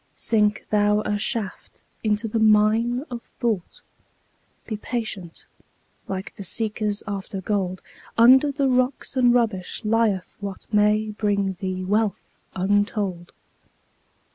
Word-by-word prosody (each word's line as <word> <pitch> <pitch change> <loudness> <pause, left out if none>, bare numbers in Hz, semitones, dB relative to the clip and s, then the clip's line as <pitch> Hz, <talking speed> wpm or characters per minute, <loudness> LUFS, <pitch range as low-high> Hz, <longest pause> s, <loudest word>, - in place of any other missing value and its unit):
Sink 210 -2 +1
thou 210 0 +3
a 210 -1 -1
shaft 205 -2 -4 0.2
into 215 +1 +1
the 225 +1 -1
mine 220 +3 +3
of 240 -1 -5 0.2
thought; 220 -7 -2 0.8
Be 220 - -4
patient, 210 -6 -5 0.6
like 190 0 -5
the 200 - -8
seekers 210 +1 -2
after 200 -1 -4
gold; 190 -2 -2 0.3
Under 260 +5 +7
the 280 -1 0
rocks 255 +1 0
and 250 -2 +5
rubbish 225 -5 0
lieth 215 -4 +1
what 200 -2 -6
May 210 +1 +3
bring 200 -2 0
thee 185 -1 -3
wealth 210 +2 -1 0.2
untold. 195 -2 0
210 Hz, 115 wpm, -24 LUFS, 195-225 Hz, 0.8 s, Under